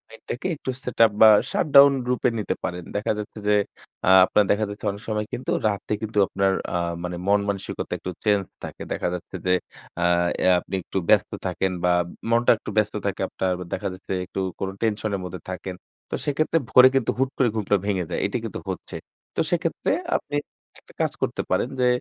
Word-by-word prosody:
নেটটাকে 125 +8 -5
একটু 130 - -4
setup 115 -4 +3
বা 110 - +10 0.2
shut - - +1
down 140 0 +10 0.2
রূপে 125 0 +2
নিতে 105 - -1
পারেন। 90 0 -3
দেখা 105 - 0
যাচ্ছে 105 +1 -7
যে 105 - +5 0.5
আ - - +6 0.2
আপনার 105 +2 +3
দেখা 110 +1 +2
যাচ্ছে 105 +1 -8
অনেক 100 - -9
সময় 105 -1 -1
কিন্তু 125 - -3 0.2
রাতে 105 +1 -2
কিন্তু 110 -1 -5
আপনার 95 0 +1 0.2
আ - - +2 0.3
মানে 90 0 -3
মন 100 +1 +4
মানসিকতা 100 -1 -4
একটু 90 - -5
চেঞ্জ 105 -2 +3 0.2
থাকে। - - -7
দেখা - - -2
যাচ্ছে 90 - -7
যে 90 - +4 0.5
আ - - +3 0.4
অ্যা 95 - +5
আপনি 95 - -6
একটু 95 - -5
ব্যস্ত - - +4 0.2
থাকেন 90 +1 -1
বা 90 - +4 0.4
মনটা 120 +1 +4
একটু - - -8
ব্যস্ত 105 0 +2
থাকে 100 - -2
আপনার। 95 -1 -1 0.2
দেখা 100 - -2
যাচ্ছে 95 +1 -6
একটু 95 - -6 0.2
কোন 95 - -2
টেনশন 110 -1 0
এর - - -7
মধ্যে 90 -2 -7
থাকেন। 95 0 -5 0.3
তো - - -2
সেক্ষেত্রে 155 +3 +1
ভোরে 130 0 +8
কিন্তু 130 -4 +2
হুট 135 0 +1
করে 125 -4 +3
ঘুমটা 105 -1 +1
ভেঙে 95 -4 0
যায়। - - -2
এটা - - -1
কিন্তু - - -5
হচ্ছে। - - -6 0.4
তো - - +1
সেক্ষেত্রে 170 -1 0 0.2
আপনি 145 - -3 0.4
একটা - - -21
কাজ - - +1
করতে - - -1
পারেন। 125 - +1
যে 125 - +4
105 Hz, 195 wpm, -24 LUFS, 95-120 Hz, 0.5 s, বা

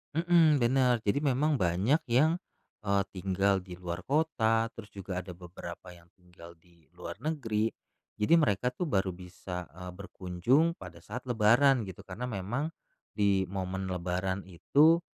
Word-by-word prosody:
Mmm, 165 -4 +4
bener, 125 -1 +3
jadi, 100 +6 +1
memang 145 0 +1
banyak 95 - +2
yang, 155 +8 +3 0.5
eee, 100 0 +3
tinggal 95 +1 +1
di 90 -1 -10
luar 90 0 -5
kota, 115 -7 +1
terus 110 -2 -10
juga 95 -2 -4
ada 90 -1 -8
beberapa 90 0 -9
yang 85 -1 -16
tinggal 85 -2 -15
di 85 0 -27
luar 90 +1 -8
negeri, 115 -7 -1 0.5
jadi 110 +11 +4
mereka 125 -4 +1
tuh 165 +7 -3
baru 95 -6 +1
bisa, 90 -1 -7
eee, 90 0 -7
berkunjung 100 - 0
pada 85 -2 -11
saat 125 +5 -7
Lebaran 120 +3 +4
gitu 95 -3 -9
karena 100 +6 -6
memang 120 - -3 0.4
di 100 -2 +2
momen 95 0 -3
lebaran 90 +2 -2
itu 150 - +4
100 Hz, 145 wpm, -30 LUFS, 90-130 Hz, 0.5 s, Mmm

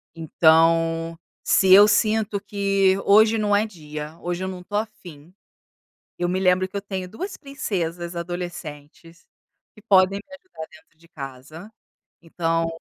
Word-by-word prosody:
Então, 165 +1 +2 0.3
se 190 -1 +4
eu 205 +2 +9
sinto 215 -1 +1
que 195 -1 +1
hoje 220 +2 +5
não 210 -1 +1
é 210 +2 +2
dia, 155 -4 -9
hoje 175 +1 -4
eu - - -3
não 185 -1 -7
estou 205 +3 -4
afim, 180 -7 -8 0.9
eu 175 0 -1
me 185 +1 -1
lembro 185 0 +2
que 200 - -9
eu 200 - -3
tenho 190 -2 -5
2 370 - -7
princesas 175 - -4
adolescentes, 170 -2 -8 0.5
que - - -15
podem 195 -2 +3
me 280 +7 -14
ajudar 280 - -11
dentro 160 0 -21
de 170 - -22
casa, 145 +6 -10 0.5
então, 165 0 -1
180 Hz, 145 wpm, -23 LUFS, 165-205 Hz, 0.9 s, eu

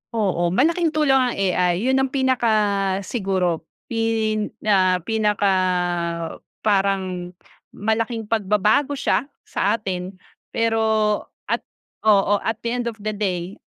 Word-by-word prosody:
Oo, 185 -6 +1
malaking 330 - +2
tulong 300 -3 +3
ang 255 -2 +2
AI, 180 -2 +2
'yon 265 - +3
ang 265 -1 +1
pinaka 260 -4 +2 0.5
siguro 190 -5 -1 0.2
pin 225 -2 0 0.2
ah 185 -3 +4
pinaka 210 -2 +2 1.1
parang 190 -3 0 0.4
malaking 225 +1 -2
pagbabago 210 +5 +2
siya 275 -5 +1 0.2
sa 205 - 0
atin. 185 -3 -4 0.4
Pero 225 -1 +1 0.6
at - - -1 0.4
oo, 205 -2 +4
at 225 -1 -2
the 235 - -3
end 240 -1 -2
of 220 - -18
the 215 +1 -3
day, 185 -2 -2
215 Hz, 120 wpm, -22 LUFS, 190-230 Hz, 1.1 s, ah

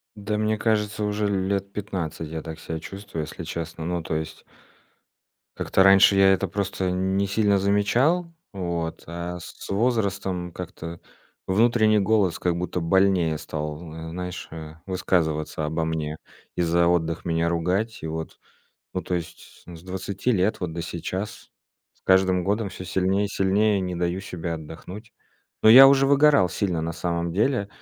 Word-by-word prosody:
Да, 105 +1 -3
мне 110 0 +1
кажется, 105 -1 0
уже 105 0 0
лет 100 0 -1
15 90 -6 -4
я 80 0 -5
так 80 0 -8
ся 80 -1 -5
чувствую, 95 0 -7
если 80 +2 -8
честно. 80 -1 -5
Ну 85 -1 -2
то 80 - -3
есть 80 0 -5 1.1
Как-то 95 - +2
раньше 95 +1 +7
я 95 0 +6
это 100 +1 0
просто 95 -1 -2
не 95 +2 0
сильно 100 0 +2
замечал. 120 - +2 0.2
Вот. 85 -3 -3
А 85 +1 -5
с - - -9 0.2
с - - -10
возрастом 100 -5 0
как-то 85 -1 -7 0.5
внутренний 110 +1 +4
голос 100 -3 +2
как 90 -1 0
будто 90 +1 -2
больнее 90 -2 +2
стал, 75 +2 -6
э, 80 0 -7
знаешь, 90 0 -5
э, 80 -1 -8
высказываться 80 -5 -1
обо 80 +2 -1
мне 80 -1 -3 0.4
и - - 0
за 85 0 +3
отдых 85 -1 0
меня 85 0 +1
ругать. 90 +7 -1
И 80 - -4
вот 80 0 -6 0.5
Ну - - -2
то 90 - -3
есть 85 -1 -7
с 85 -1 -10
с - - -16
20 95 +6 -2
лет 100 0 +1
вот 90 -3 -3
до 85 - -3
сейчас. 95 +5 -5 0.4
С - - -36
каждым 95 -1 +3
годом 105 +1 0
всё 95 0 -9
сильнее 95 +2 +1
и - - -2
сильнее 100 +1 +2
не 90 -1 -3
даю 85 +2 -1
себе 85 -3 -5
отдохнуть. 85 +8 -9 0.5
Но 110 - +6
я 135 +3 +11
уже 135 0 +4
выгорал 140 -8 +5
сильно 90 -2 -1
на 85 +1 -2
самом 85 0 -2
деле. 105 +1 +1
95 Hz, 165 wpm, -24 LUFS, 85-100 Hz, 1.1 s, я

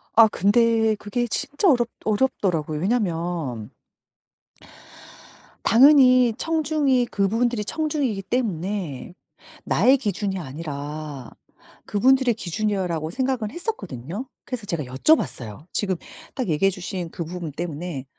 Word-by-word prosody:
아 225 0 +8
근데 225 +2 +3
그게 240 +4 -2
진짜 290 - 0
어렵 240 -5 +3 0.2
어렵더라고요. 185 - 0
왜냐하면 170 - -1 1.9
당연히 255 -1 +6
청중이 300 -6 +1
그분들이 225 +3 0
청중이기 290 -8 -1
때문에 190 - -3 0.5
'나의 265 +2 +4
기준이 200 -4 -2
아니라 145 -2 -6 0.6
그분들의 255 +4 +3
기준이요.'라고 180 -5 -2
생각은 255 -2 -1
했었거든요. 205 - -5 0.2
그래서 245 -4 -5
제가 170 -6 -2
여쭤봤어요. 130 - 0
지금 190 -3 0 0.4
딱 255 -7 -2
얘기해 165 +5 +3
주신 185 -2 -5
그 170 - -4
부분 170 -1 -6
때문에 160 -2 -5
205 Hz, 285 characters per minute, -23 LUFS, 165-245 Hz, 1.9 s, 아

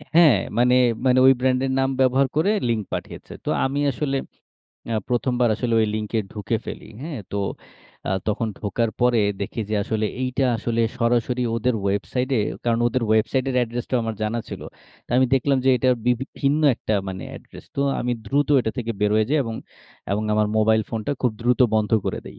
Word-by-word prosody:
হ্যাঁ, 160 -9 +7 0.2
মানে, 125 +1 +4 0.3
মানে, 130 0 +4
ওই 135 - +8
ব্র্যান্ডের 130 +1 +1
নাম 135 0 +2
ব্যবহার 130 +1 +3
করে 160 +7 +3 0.2
লিঙ্ক 110 -2 0
পাঠিয়েছে। - - -6
তো - - -2 0.2
আমি 135 +2 -1
আসলে 135 +1 -1 0.8
আ - - 0
১ম 125 +1 0
বার 120 - +4
আসলে 115 0 -1
ওই 110 - +3
লিংকে 110 +1 -2
ঢুকে 105 +2 -2
ফেলি - - -8
হ্যাঁ, 150 -6 -5
তো - - -2 0.7
আ - - 0 0.2
তখন 110 +2 0
ঢোকার 110 +2 -1
পরে 120 -2 +4 0.2
দেখি 100 +3 -4
যে - - 0
আসলে 110 +1 -1 0.2
এইটা 130 +1 0
আসলে 115 0 -1 0.2
সরাসরি 120 +1 +1
ওদের 125 +2 +1
ওয়েবসাইটে 125 +7 -1 0.3
কারণ 115 -1 +2
ওদের 120 +1 0
ওয়েবসাইটের 125 +5 +1
অ্যাড্রেসটাও 120 +1 -1
আমার 115 -1 -2
জানা 110 +2 -1
ছিল। - - -7 0.5
তো - - -22
আমি 130 0 +4
দেখলাম 135 +1 +2
যে - - +3
এটা 130 +2 +1 0.2
বিভি 125 +1 +2 0.2
ভিন্ন 140 +2 +2
একটা 110 - -2
মানে 95 -1 -5
অ্যাড্রেস। - - -12
তো - - 0 0.2
আমি 125 - -1
দ্রুত 140 +6 +1
এটা 110 - -2
থেকে 115 -1 -2
বের 105 0 +2
হয়ে 110 0 +3
যাই 155 - +3
এবং, 115 -1 -4 0.6
এবং, 105 +2 0
আমার 105 0 +3
মোবাইল 110 0 +3
ফোনটা 115 +5 -2
খুব 125 - +3
দ্রুত 125 +2 +1
বন্ধ 110 -1 +1
করে - - -2
দেই - - -11
120 Hz, 190 wpm, -23 LUFS, 110-130 Hz, 0.8 s, ওই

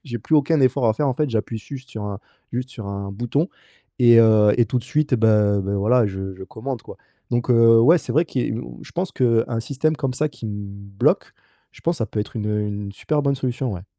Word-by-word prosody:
j'ai 120 -4 -5
plus 155 - +1
aucun 150 +1 +2
effort 130 -1 +3
à 110 - +4
faire, 145 +5 0
en 130 - 0
fait, 150 +2 0
j'appuie 110 0 -2
juste 135 +3 -10
sur 110 -4 -6
un 100 -1 -5 0.3
juste 125 +2 -3
sur 110 -6 -8
un 100 0 -5
bouton 120 - -1 0.5
et 120 -2 +7
heu 110 -2 +5
et 120 - +4
tout 125 - 0
de 120 - -7
suite 145 +2 0
ben 105 -3 +3
ben 100 +1 -2
voilà 110 +3 +3
je 95 -1 -5
je 95 - -9
commande 120 +5 -6
quoi. - - -11 0.3
Donc 120 +1 -1
heu, 115 -1 +6
ouais, 165 +9 +6
c'est - - -5
vrai 160 +3 +3
qui 135 - -3
est - - -2
mmh - - -7
je - - -14
pense 180 +1 -2
qu'un 115 -2 +1
système 140 +5 -1
comme 135 -3 -2
ça 150 +4 0
qui 115 - -9
me 105 -1 -5 0.4
bloque, - - +2 0.4
je - - -17
pense 170 +1 0
ça 115 - -1
peut 105 - -3
être 105 - -6
une, 105 - -3
heu, 105 0 0
une 100 -1 -4
super 150 +8 -1
bonne 140 -1 +1
solution, 130 -2 -2
ouais. 90 +1 -8
115 Hz, 250 wpm, -22 LUFS, 105-135 Hz, 0.5 s, et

